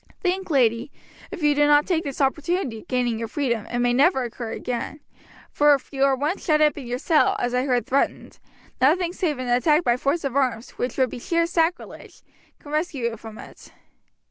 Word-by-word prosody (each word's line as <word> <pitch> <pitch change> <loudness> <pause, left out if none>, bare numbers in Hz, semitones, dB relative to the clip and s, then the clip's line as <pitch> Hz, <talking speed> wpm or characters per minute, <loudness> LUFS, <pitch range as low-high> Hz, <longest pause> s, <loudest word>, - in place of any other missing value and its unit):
Think, 375 0 -2
lady, 245 -3 +1 0.4
if 370 -5 -7
you 295 0 +4
do 290 0 +3
not 295 0 +5
take 340 -3 0
this 280 -3 -5
opportunity 285 - -1
of - - -17
gaining 245 -3 -1
your 230 - -3
freedom, 235 -3 -2
it 240 - -4
may 245 0 +2
never 265 +1 +3
occur 235 -1 -6
again, 250 +4 -4 0.5
for 295 0 +5
if 275 - -10
you 270 0 0
are 275 -1 +3
once 295 +8 -2
shut 305 -3 +2
up 300 -1 +3
in 270 -5 -8
your 245 +1 -2
cell, 330 +7 +2
as 245 -10 -2
I 250 +1 +1
heard 245 -2 +1
threatened, 275 +2 -1 0.4
nothing 340 +6 +3
save 335 -7 -1
an 255 0 -5
attack 275 +7 +3
by 240 -4 +2
force 280 +6 -1
of 275 -2 -3
arms, 255 -4 0
which 245 -1 -4
would 260 -3 +2
be - - -6
sheer 335 +6 0
sacrilege, 335 0 -3 0.3
can 290 - -13
rescue 295 -6 -1
you - - -7
from 220 0 -11
it. - - -13
275 Hz, 210 wpm, -23 LUFS, 245-310 Hz, 0.5 s, not